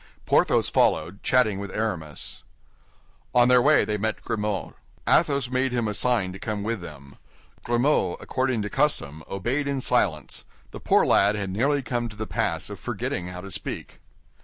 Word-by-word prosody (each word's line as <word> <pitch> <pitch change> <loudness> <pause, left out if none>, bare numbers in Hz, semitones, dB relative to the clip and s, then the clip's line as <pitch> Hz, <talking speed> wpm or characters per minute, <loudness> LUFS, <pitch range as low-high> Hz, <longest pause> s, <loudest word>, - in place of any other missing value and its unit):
Porthos - - +3
followed, 85 +6 +1
chatting 110 -7 +2
with 100 0 -5
Aramis. 90 -10 -3 0.9
On 120 0 +6
their 125 -1 +6
way - - +5
they 105 -1 -2
met 110 +1 -2
Grimaud. 105 -3 -2 0.3
Athos 140 -3 +3
made 130 0 +1
him 120 -3 0
a 105 - -2
sign 105 -5 +1
to 95 - -9
come 105 -1 -3
with 115 -1 -2
them. 70 -4 -11 0.5
Grimaud, 120 -6 +1
according 130 -4 -1
to 105 - -3
custom, 80 - 0
obeyed 120 +9 -1
in 140 -1 -1
silence; 100 - 0 0.3
the - - -8
poor - - +3
lad 100 +1 +4
had 100 -2 -3
nearly 140 +8 +1
come 120 -2 -2
to 105 - -12
the 110 +1 -4
pass - - -2
of - - -7
forgetting 90 - -3
how 90 0 -7
to 100 +1 -9
speak. - - -6
110 Hz, 170 wpm, -25 LUFS, 95-125 Hz, 0.9 s, On